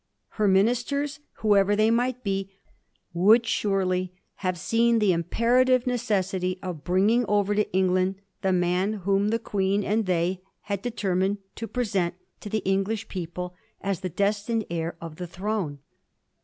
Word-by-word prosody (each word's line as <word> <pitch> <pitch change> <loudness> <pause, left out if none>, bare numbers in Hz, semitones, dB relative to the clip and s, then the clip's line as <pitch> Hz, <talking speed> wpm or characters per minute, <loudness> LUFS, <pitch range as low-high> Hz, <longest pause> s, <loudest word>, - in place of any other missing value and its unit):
Her 210 -1 0
ministers, 245 +9 +1 0.2
whoever 205 -1 +4
they 215 +2 +3
might 250 +2 0
be, 195 -1 -2 0.6
would 215 +7 +5
surely 185 -4 0 0.2
have 185 -2 -2
seen 230 +5 +2
the 210 -4 +3
imperative 240 +9 +2
necessity 195 -7 0
of 175 -6 -5
bringing 200 +7 +3
over 205 0 +2
to 210 +1 0
England 185 0 +2 0.3
the 190 -1 +1
man 180 +3 +1
whom 200 +1 +2
the 225 +2 +2
Queen 200 -2 0
and 210 +1 0
they 180 +1 0 0.2
had 200 -2 -3
determined 200 -4 0 0.2
to 225 - -6
present 200 -7 -1 0.2
to 210 - -8
the 215 0 -1
English 195 +3 0
people 180 0 -5 0.3
as 195 -3 -2
the 185 - -3
destined 205 +4 0
heir 165 0 -2
of 165 -2 -8
the 180 - -5
throne. 185 -4 -3
195 Hz, 145 wpm, -26 LUFS, 185-220 Hz, 0.6 s, would